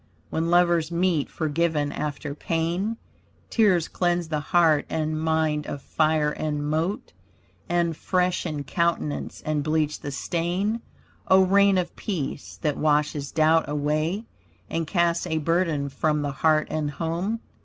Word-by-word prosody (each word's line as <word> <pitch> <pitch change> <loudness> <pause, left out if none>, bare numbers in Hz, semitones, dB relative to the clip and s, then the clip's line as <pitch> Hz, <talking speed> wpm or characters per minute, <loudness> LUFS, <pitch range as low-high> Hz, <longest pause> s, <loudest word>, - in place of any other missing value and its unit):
When 165 +1 0
lovers 175 -2 +3
meet 170 -3 +1
forgiven 155 -2 0
after 150 -1 -4
pain, 170 +8 -1 0.5
Tears 190 -7 +3
cleanse 175 -2 0
the 155 -2 0
heart 160 -1 +3
and 155 -1 -1
mind 160 -2 0
of 140 - -4
fire 155 +1 +1
and 150 -1 -2
mote, 160 +6 -2 0.6
And 170 -2 +1
freshen 180 -4 -1
countenance 170 -2 -1
and 150 -1 0
bleach 155 0 0
the - - -5
stain. 175 +10 -1 0.5
O 190 0 +6
rain 200 0 +4
of 180 -1 -2
peace, 150 -8 -4
that 150 -3 0
washes 150 -2 +1
doubt 160 0 +3
away, 155 +8 -1 0.5
And 165 -1 -1
casts 170 0 +1
a 160 -2 -1
burden 160 -2 +1
from 150 +2 0
the 145 - -1
heart 155 +2 +2
and 155 -1 -1
home. 170 +8 -2
160 Hz, 135 wpm, -25 LUFS, 150-175 Hz, 0.6 s, O